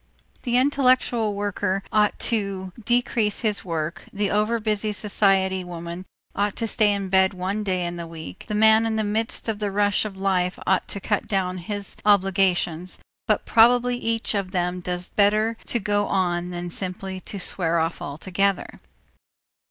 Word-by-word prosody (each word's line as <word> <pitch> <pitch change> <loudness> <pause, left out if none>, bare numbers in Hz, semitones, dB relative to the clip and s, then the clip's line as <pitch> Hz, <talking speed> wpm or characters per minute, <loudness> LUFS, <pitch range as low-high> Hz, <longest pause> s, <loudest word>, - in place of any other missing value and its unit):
The 245 -2 +1
intellectual 255 -5 +2
worker 200 -1 -1
ought 210 -1 +3
to 195 -4 -2
decrease 235 -3 +1
his 215 -3 0
work, 165 +1 -4
the 205 -1 -1
overbusy 215 0 0
society 195 -3 +2
woman 170 +1 -7 0.3
ought 205 0 0
to 230 - -2
stay 215 -1 +3
in 200 -1 -2
bed 190 0 +3
one 190 +4 -2
day 185 -3 -1
in 175 0 -4
the 170 -1 -6
week, 160 - -9
the 210 - -2
man 220 +1 +5
in 220 - -1
the 220 - 0
midst 220 +3 -2
of 220 -2 -2
the 205 -1 -1
rush 205 0 +2
of 205 -3 -6
life 185 -2 0
ought 190 - +1
to 200 - -5
cut 205 +1 -1
down 185 -2 -1
his 200 +3 -3
obligations, 185 -3 +2 0.3
but - - +1
probably 245 +1 +4
each 230 -2 -1
of 200 -3 -1
them 180 -1 -1
does 180 0 -3
better 215 +2 +2
to 240 - +1
go 205 0 0
on 175 -2 0
than 175 0 -5
simply 190 +1 -3
to 200 +2 -7
swear 170 -2 0
off 165 0 -1
altogether. 185 +7 -1
200 Hz, 165 wpm, -24 LUFS, 180-215 Hz, 0.3 s, man